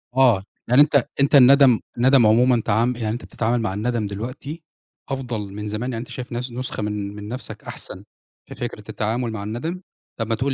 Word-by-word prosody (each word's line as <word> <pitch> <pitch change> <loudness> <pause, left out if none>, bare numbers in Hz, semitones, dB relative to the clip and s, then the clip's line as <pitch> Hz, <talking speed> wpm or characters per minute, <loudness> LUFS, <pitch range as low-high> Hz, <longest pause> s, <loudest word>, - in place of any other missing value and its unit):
آه 125 -8 +5 0.2
يعني 125 +4 +6
أنت 145 -4 +4
أنت 140 +1 +4
الندم 135 -2 +7 0.2
الندم 130 0 +5
عمومًا 120 +2 +4
تعام 115 +4 +2
يعني 115 -2 -3
أنت 115 +3 -4
بتتعامل 120 +1 -1
مع 105 -4 -1
الندم 110 +2 -1
دلوقتي 125 - -6 0.5
أفضل 125 -5 -3
من 105 +1 -5
زمان، 110 +5 -3
يعني 115 - -3
أنت 120 - -10
شايف 125 0 -7
نس 125 +1 -4
نسخة 125 -2 -4
من 105 -1 -3
من 105 0 -8
نفْسك 125 +4 -7
أحسن - - -7 0.4
في - - -10
فكرة - - -5
التعامل 115 +2 -2
مع 110 -2 -5
الندم؟ 145 - -4 0.4
طَب 115 - -2
ما 115 - +1
تقول 135 +4 -1
120 Hz, 195 wpm, -22 LUFS, 110-130 Hz, 0.5 s, الندم